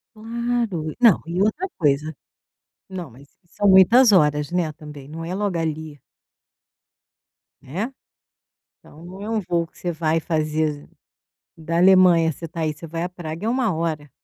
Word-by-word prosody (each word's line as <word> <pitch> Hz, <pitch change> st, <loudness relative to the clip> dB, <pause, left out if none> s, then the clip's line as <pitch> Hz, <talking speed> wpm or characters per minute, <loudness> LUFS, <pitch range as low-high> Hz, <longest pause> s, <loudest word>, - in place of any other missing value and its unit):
Claro. 230 Hz, -7 st, -3 dB
Não, 230 Hz, -7 st, +6 dB
e 175 Hz, +3 st, -2 dB
outra 220 Hz, -, 0 dB
coisa 150 Hz, 0 st, 0 dB, 0.7 s
não, 180 Hz, -5 st, -6 dB
mas 135 Hz, +4 st, -17 dB, 0.2 s
e -, -, -33 dB
são 205 Hz, +4 st, -1 dB
muitas 215 Hz, +6 st, +7 dB
horas, 150 Hz, -5 st, +3 dB
né, 175 Hz, -3 st, 0 dB
também. 150 Hz, -3 st, -11 dB
Não 160 Hz, +2 st, -8 dB
é 175 Hz, -, -4 dB
logo 200 Hz, -2 st, -1 dB
ali. 155 Hz, -2 st, -4 dB, 1.6 s
Né. 195 Hz, -, -4 dB, 0.9 s
Então 155 Hz, +3 st, -16 dB
não 185 Hz, +2 st, -10 dB
é 210 Hz, -, -5 dB
um 225 Hz, -2 st, 0 dB
voo 170 Hz, -2 st, -1 dB
que -, -, -26 dB
você 175 Hz, -, -3 dB
vai 160 Hz, 0 st, 0 dB
fazer 155 Hz, -2 st, -2 dB, 0.7 s
da 165 Hz, +1 st, -3 dB
Alemanha, 180 Hz, -3 st, +5 dB
você 165 Hz, -, -8 dB
está 165 Hz, +1 st, -6 dB
aí, 155 Hz, -1 st, 0 dB
você 155 Hz, +3 st, -11 dB
vai 165 Hz, +1 st, -4 dB
a 180 Hz, -, -3 dB
Praga 175 Hz, +1 st, -7 dB
é -, -, +1 dB
1 240 Hz, -6 st, 0 dB
hora. 155 Hz, -3 st, -3 dB
170 Hz, 165 wpm, -22 LUFS, 155-190 Hz, 1.6 s, muitas